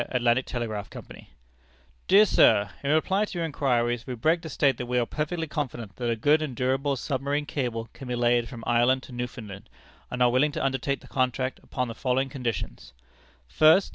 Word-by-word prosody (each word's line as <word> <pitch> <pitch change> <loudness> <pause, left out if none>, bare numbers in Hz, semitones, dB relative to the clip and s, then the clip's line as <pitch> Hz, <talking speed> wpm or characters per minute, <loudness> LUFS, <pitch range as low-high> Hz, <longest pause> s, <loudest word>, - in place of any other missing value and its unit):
Atlantic 125 0 +1
Telegraph 110 -4 -4
Company_: - - -11 0.8
"Dear 205 +3 +7
Sir: 105 - +4
In 140 - -1
reply 190 +7 +2
to 195 - -7
your 170 - 0
inquiries, 120 -5 0
we 125 - -4
beg 160 +8 +1
to 165 - -7
state, 140 -5 +2
that 125 - -5
we 125 0 0
are 120 - +2
perfectly 160 +5 -3
confident 125 -9 -5
that 120 -1 -2
a 115 - +1
good 145 +7 +3
and 145 -5 -4
durable 135 +3 0
Submarine 140 +2 -2
Cable 120 -6 -3
can 135 - -10
be 125 - -2
laid 120 -1 +2
from 120 -4 -9
Ireland 120 +2 +3
to - - -12
Newfoundland, 115 -5 -7 0.4
and 125 0 0
are 120 - +4
willing 145 +4 +2
to - - -2
undertake 135 +1 -1
the - - -15
contract 130 0 -1
upon 125 0 -3
the 115 - -5
following 130 +2 0
conditions: 125 -4 -5 0.5
"First. 160 - +5
130 Hz, 195 wpm, -26 LUFS, 120-145 Hz, 0.8 s, Dear